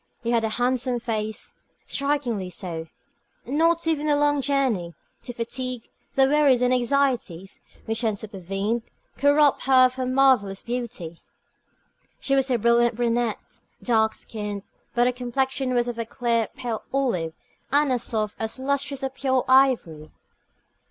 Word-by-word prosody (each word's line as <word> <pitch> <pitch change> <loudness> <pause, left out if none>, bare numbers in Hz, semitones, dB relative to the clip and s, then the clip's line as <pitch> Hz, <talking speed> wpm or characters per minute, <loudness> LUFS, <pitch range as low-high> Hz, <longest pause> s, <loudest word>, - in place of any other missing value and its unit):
She 235 - -1
had 230 -1 +2
a 220 - 0
handsome 245 +2 0
face 220 -2 -4 0.3
strikingly 275 -9 -1
so. 165 -3 -5 0.6
Not 330 +5 +2
even 310 -2 0
the 295 - +3
long 290 -1 +2
journey, 255 -12 0 0.3
the 245 - -7
fatigue, 245 +1 -4 0.3
the 270 - +5
worries 275 -3 +4
and 250 0 +3
anxieties 245 -8 0 0.3
which 225 +1 -2
had 220 -3 0
supervened, 200 +2 -3 0.4
could 285 - +4
rob 295 -2 +4
her 260 -1 +6
of 255 - +1
her 255 -1 -2
marvellous 255 -7 +3
beauty. 235 -9 -5 1.0
She 275 - -1
was 270 0 +3
a 250 - +2
brilliant 235 +1 +3
brunette, 235 -1 -1 0.2
dark 220 -2 +2
skinned; 210 -2 -5 0.3
but 240 0 +4
her 250 - +2
complexion 260 +1 -1
was 240 0 +2
of 240 -1 -4
a 230 - -2
clear, 235 -2 0
pale 240 -4 -4
olive, 210 -13 0 0.4
and 290 0 +3
as 250 -2 +1
soft, 215 -3 -2
as 220 +2 -3
lustrous 275 +1 -2
as 265 - -1
pure 265 -1 0
ivory. 250 - +3
245 Hz, 150 wpm, -24 LUFS, 220-270 Hz, 1.0 s, her